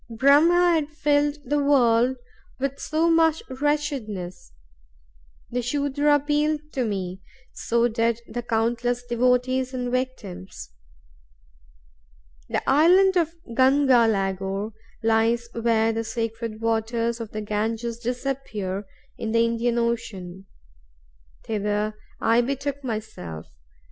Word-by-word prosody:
Brahm 280 +8 +5
had 345 -4 +3
filled 295 -1 +1
the 290 +2 +1
world 250 -2 +3 0.4
with 275 +1 -3
so 320 +2 0
much 325 -1 +3 0.2
wretchedness. 260 - -2 1.0
The 245 +1 -1
Sudra 285 +3 +1
appealed 295 +1 +1
to 255 -2 0
me, 190 -3 -4 0.3
so 235 +1 +1
did 230 0 0
the 240 - -4
countless 240 +1 0
devotees 250 +2 +1
and 245 -1 -2
victims. 195 - -5 1.8
The - - -2
island 365 +7 +5
of 335 -1 +1 0.2
Ganga 260 -2 +5
Lagor 195 0 -1 0.3
lies 225 +1 +2
where 225 -1 +2
the 225 +1 -2
sacred 225 0 -4
waters 230 +1 0
of 230 -2 -6
the 215 - -5
Ganges 225 +3 -2
disappear 240 -6 -3 0.3
in 220 0 -3
the 230 0 +4
Indian 235 +1 0
Ocean. 200 -6 -3 1.0
Thither 210 0 -1 0.3
I 230 +1 +3
betook 275 +2 -3
myself. 215 - -6
235 Hz, 110 wpm, -24 LUFS, 220-275 Hz, 1.8 s, Brahm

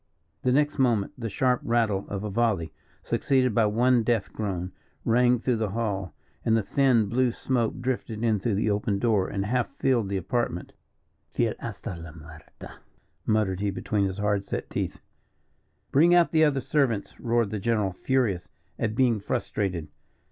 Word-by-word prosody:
The 125 - +1
next 145 +2 +2
moment 115 -6 +2
the 115 -2 -4
sharp 125 +4 +1
rattle 110 -4 +1
of 100 0 -4
a 105 - -3
volley, 100 -7 0 0.3
succeeded 130 -3 +1
by 110 0 +3
one 120 +3 +3
death 115 -2 0
groan, 95 -4 -3 0.3
rang 125 +1 +4
through 120 0 0
the 110 -2 -1
hall, 100 -5 -3 0.3
and 115 0 +3
the 110 - 0
thin 125 -2 +3
blue 125 +5 +1
smoke 120 0 -1
drifted 120 -3 -3
in 110 -3 +2
through 105 +2 0
the 105 +1 +1
open 100 0 0
door, 105 -3 +2
and 100 -1 -2
half 120 +2 0
filled 120 -7 +1
the 100 - -1
apartment. 95 -2 -2 0.6
"Fiel - - 0
hasta - - -6
la 80 -2 -9
muerte," 80 0 -13 0.5
muttered 105 -4 +1
he 100 0 0
between 100 +1 -1
his 95 0 -3
hard 105 -1 0
set - - -5
teeth. - - -3 0.9
"Bring 170 +5 +5
out 175 -1 +4
the 160 -1 +5
other 140 -3 +1
servants," 125 -8 0
roared 115 -3 +1
the 105 - -2
general, 105 -2 0
furious 110 -4 0 0.3
at 110 -1 -1
being 120 -3 +3
frustrated. 95 -4 -2
110 Hz, 170 wpm, -26 LUFS, 100-125 Hz, 0.9 s, Bring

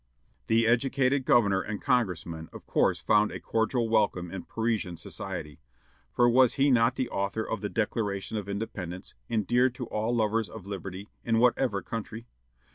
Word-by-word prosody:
The 115 +1 +3
educated 130 +3 +2
governor 105 -9 +4
and 105 -1 -5
congressman 85 -9 -1
of - - -11
course - - +2
found 105 -1 +3
a - - -6
cordial 115 +1 0
welcome 100 -6 +1
in 95 - -6
Parisian 110 -6 -2
society, 80 -2 -6 0.5
for 120 - +3
was 125 0 +5
he 140 +1 +3
not 120 0 +4
the 130 - -1
author 100 +3 -2
of 110 - -3
the 105 - -2
Declaration 105 -2 -2
of 100 -2 -4
Independence, 95 -3 -5 0.2
endeared 120 +3 +2
to 125 - -5
all 110 +3 -1
lovers 110 -2 +1
of 100 0 -10
liberty, 95 0 -6 0.2
in 115 -1 +1
whatever 120 -3 +2
country. 115 0 -6
110 Hz, 160 wpm, -28 LUFS, 100-120 Hz, 0.5 s, was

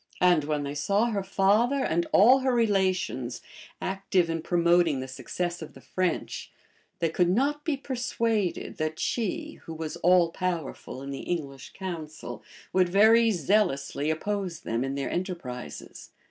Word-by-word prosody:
And 175 -5 +4
when 150 -1 -1
they 140 0 -4
saw 200 +10 +1
her 200 -2 -1
father 210 +8 +2
and 170 +1 0
all 245 +7 +7
her 260 -1 +1
relations 190 - 0 0.4
active 190 -3 0
in 165 0 -2
promoting 170 -3 +3
the 130 - -5
success 170 +7 -4
of 160 - -9
the - - -12
French, 185 -2 -2 0.5
they 165 - 0
could 175 +2 +2
not 280 +9 +1
be 305 -4 0
persuaded 230 -7 -1
that 155 0 -2
she, 310 +7 -2
who 165 - -7
was 160 -1 -5
all 175 -1 +4
powerful 165 -7 -4
in 140 - -6
the 135 - -5
English 140 -6 -5
council, 155 - -6 0.3
would 185 -1 +3
very 220 +4 +6
zealously 155 -6 +1
oppose 185 +1 -2
them 115 +2 -1
in 135 +1 -3
their 140 -1 -2
enterprises. 155 - -6
175 Hz, 150 wpm, -27 LUFS, 155-205 Hz, 0.5 s, all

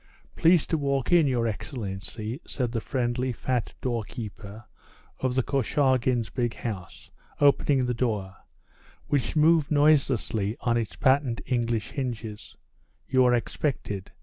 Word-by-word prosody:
"Please 165 -1 +4
to 160 - -1
walk 140 -1 0
in, 170 -4 +5
your 120 -3 +1
excellency," 110 - -5
said 125 -4 -2
the 115 -2 -2
friendly, 125 0 -1
fat 125 0 -2
doorkeeper 110 -3 -5 0.5
of 130 -1 -1
the 130 - +2
Korchagins' 130 -3 +1
big 120 -3 -1
house, 100 -7 -7 0.3
opening 140 -2 +4
the 125 - 0
door, 105 -5 -2 0.7
which 145 -1 0
moved 155 -1 +4
noiselessly 135 -8 +2
on 120 -1 +1
its 115 -2 -2
patent 130 -3 +2
English 115 -3 -1
hinges; 115 -6 -5 0.5
"you 130 -1 +4
are 125 0 +5
expected. 115 -4 -3
125 Hz, 125 wpm, -27 LUFS, 115-135 Hz, 0.7 s, in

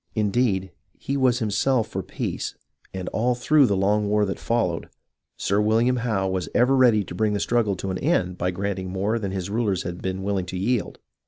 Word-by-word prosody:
Indeed, 105 -3 +1 0.3
he 140 - -3
was 130 -3 +3
himself 110 +2 +1
for - - -3
peace, - - -4 0.4
and 95 -1 -5
all 120 +3 +1
through 140 +3 +4
the 100 - +1
long 105 +2 +1
war 105 0 +3
that 95 - -4
followed. 100 -8 -1 0.5
Sir 100 +2 +1
William 115 +4 +2
Howe 110 -5 0
was 95 -3 -2
ever 125 +3 +4
ready 120 -5 +5
to 90 - -9
bring 105 +3 +1
the 100 - 0
struggle 115 -4 +1
to 95 +1 -4
an 95 - -3
end 95 - +1
by 90 - 0
granting 95 0 -3
more 100 +5 -1
than 100 -3 -3
his 95 0 -4
rulers 105 -5 0
had 85 0 -6
been 95 0 -3
willing 95 -2 -1
to 95 - -5
yield. 115 +4 -1
105 Hz, 200 wpm, -24 LUFS, 95-120 Hz, 0.5 s, ready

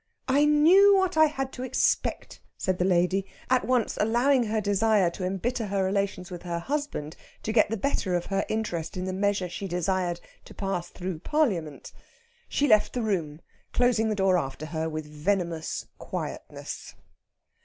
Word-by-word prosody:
"I 280 +3 +4
knew 350 +7 +6
what 380 -1 +1
I 315 0 +7
had 270 -3 -2
to 250 - -7
expect!" 260 0 0 0.2
said 185 -1 -1
the 180 - +2
lady, 185 +1 +2 0.3
at 255 -1 +3
once 250 -3 +1
allowing 240 +4 +3
her 220 0 0
desire 205 -2 +2
to 185 - -7
embitter 215 +5 -2
her 195 -1 0
relations 190 -1 -1
with 175 - -6
her 170 -1 -3
husband 265 - -3 0.3
to 220 - -2
get 215 -3 +4
the 225 - -2
better 195 -6 0
of 175 - -1
her 195 -1 0
interest 185 -7 -3
in 180 - -3
the 185 - -3
measure 195 -1 0
she 180 +3 -5
desired 180 0 -1 0.3
to - - -13
pass 190 -3 -3
through 180 -3 -5
Parliament. 185 - -1 0.6
She 290 - +1
left 215 -4 +4
the 245 - -1
room, 170 -7 -2 0.3
closing 240 -3 +2
the 215 - 0
door 190 -2 +3
after 135 +1 -5
her 160 0 -3
with 155 -1 -5
venomous 165 +1 -2
quietness. - - -6
195 Hz, 170 wpm, -27 LUFS, 175-245 Hz, 0.6 s, I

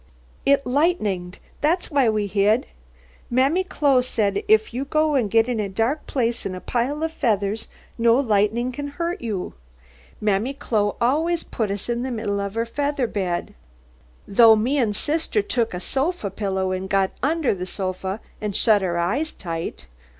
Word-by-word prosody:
"It 280 0 +4
lightened, 215 - 0 0.2
that's 335 +5 +1
why 275 -5 +3
we 215 -1 0
hid. 205 +5 +2 0.6
Mammy 270 +9 +2
Chloe 285 -8 +2
thed 205 -5 0
if 220 +1 +3
you 255 +3 -2
go 305 -2 +2
get 225 +3 +3
in 245 -3 -1
a 205 -2 -1
dark 230 +10 -1
plathe 240 -3 0
on 185 - -5
a - - -6
pile 260 +9 -1
of 320 - -1
featheths, 215 -7 0 0.3
no 230 0 +5
lightnin' 225 0 +1
can 285 +3 -5
hurt 335 +4 -3
you. 215 -6 -3 0.7
Mammy 215 +6 0
Chloe 210 -6 0
always 320 +8 +1
puth 220 -3 -3
uth 200 0 -4
in 240 0 -1
the 260 - -2
middle 215 -4 -2
of 200 +1 -4
her 230 0 0
feather 285 +2 -1
bed. 185 -6 -2 0.7
Tho 225 +2 +7
me 250 +7 +1
and 215 -5 +1
thithter 325 - 0
took 235 - 0
a 180 - -4
thofa 270 - -1
pillow 190 -2 -1
and 185 +1 -3
got 195 -1 +2
under 305 -1 +1
the 180 -2 -5
thofa 190 +2 -3 0.2
and 210 -2 -3
shut 215 -3 +4
our 175 -2 -1
eyeth 235 - -1
tight. 165 - -5
230 Hz, 170 wpm, -23 LUFS, 200-280 Hz, 0.7 s, Tho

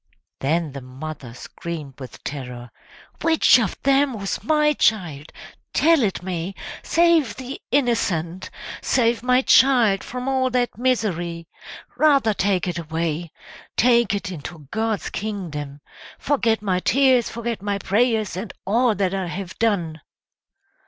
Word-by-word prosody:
Then 155 +2 0
the 140 0 -7
mother 135 0 -8
screamed 150 -1 -7
with 130 -2 -10
terror, 125 -4 -7 0.5
"Which 320 -5 +5
of 215 -6 -2
them 275 0 +3
was 195 -1 -4
my 300 -1 +3
child? 170 - 0 0.4
Tell 325 -2 +4
it 195 -5 -1
me! 180 +1 -4 0.3
Save 335 -8 +3
the 260 +1 -7
innocent! 190 - 0 0.3
Save 235 -2 +2
my 250 +1 +3
child 240 -9 +5
from 250 +1 -6
all 260 -1 +1
that 245 -1 0
misery! 175 -9 -1 0.5
Rather 280 -8 +4
take 195 -2 0
it 175 -1 -2
away! 165 0 -3 0.5
Take 235 -3 +4
it 200 -1 -4
into 160 -2 -9
God's 220 -2 -2
kingdom! 155 -9 -5 0.4
Forget 230 -6 +1
my 185 -3 +1
tears, 255 +2 +3
forget 235 -3 -4
my 200 0 -1
prayers, 220 0 +1
and 190 +2 -5
all 230 +3 +2
that 195 -2 0
I 190 -2 -2
have 180 +1 -6
done!" 175 -9 0
200 Hz, 130 wpm, -22 LUFS, 170-250 Hz, 0.5 s, Which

